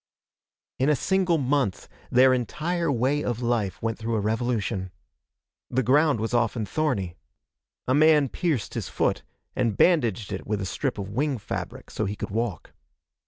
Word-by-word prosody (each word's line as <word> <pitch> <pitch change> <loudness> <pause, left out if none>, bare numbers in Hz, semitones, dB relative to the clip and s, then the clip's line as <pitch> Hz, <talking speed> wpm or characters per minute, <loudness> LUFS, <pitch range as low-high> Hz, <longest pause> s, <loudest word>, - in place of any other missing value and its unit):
In 135 +3 +3
a 150 - +4
single 185 +3 +1
month 135 - 0 0.2
their 130 +1 +6
entire 165 +6 -1
way 135 +4 +1
of 120 -2 -2
life 115 -5 0
went 115 0 -1
through 115 0 -2
a - - +1
revolution. 110 -3 -1 0.8
The 130 +1 +1
ground 145 +1 +3
was 110 +2 -2
often 115 -2 +1
thorny. 110 - -1 0.7
A 130 - +3
man 150 0 +5
pierced 145 - -2
his - - -4
foot, - - 0 0.3
and 110 -4 0
bandaged 120 - +2
it - - -6
with 105 -1 -1
a 95 - -3
strip 90 - -2
of 100 -1 -5
wing 135 +4 0
fabric 105 - -6
so 110 - -2
he 100 +2 -3
could - - -5
walk. 110 -5 -3
120 Hz, 165 wpm, -26 LUFS, 110-145 Hz, 0.8 s, their